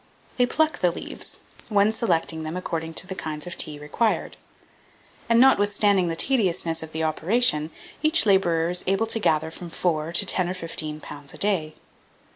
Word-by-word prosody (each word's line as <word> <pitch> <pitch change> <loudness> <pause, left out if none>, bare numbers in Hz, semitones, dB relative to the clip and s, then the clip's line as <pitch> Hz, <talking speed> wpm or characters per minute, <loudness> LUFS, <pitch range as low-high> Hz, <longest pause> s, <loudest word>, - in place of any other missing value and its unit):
They 245 -1 +4
pluck 315 +4 +1
the 180 - +3
leaves, 170 - -6 0.3
one 205 0 +4
selecting 165 -8 0
them 155 +3 -4
according 165 -2 -4
to - - -1
the 190 - -5
kinds 155 -4 -5
of 180 - -7
tea 150 -1 -2
required; 150 +10 -1 0.9
and, 230 0 +5
notwithstanding 205 -6 +4
the 165 - -1
tediousness 180 -8 0
of 160 0 -8
the 160 0 -2
operation, 160 0 +2 0.3
each 310 -4 +3
labourer 175 -4 +3
is 180 - -1
able 195 +4 +2
to 225 0 -2
gather 160 -5 +1
from 175 +1 -9
four 165 -2 -1
to 175 +4 +2
ten 185 -1 +1
or 185 - -3
fifteen 155 -3 -5
pounds 145 -1 -9
a - - -11
day. 170 -7 0
175 Hz, 175 wpm, -24 LUFS, 160-205 Hz, 0.9 s, and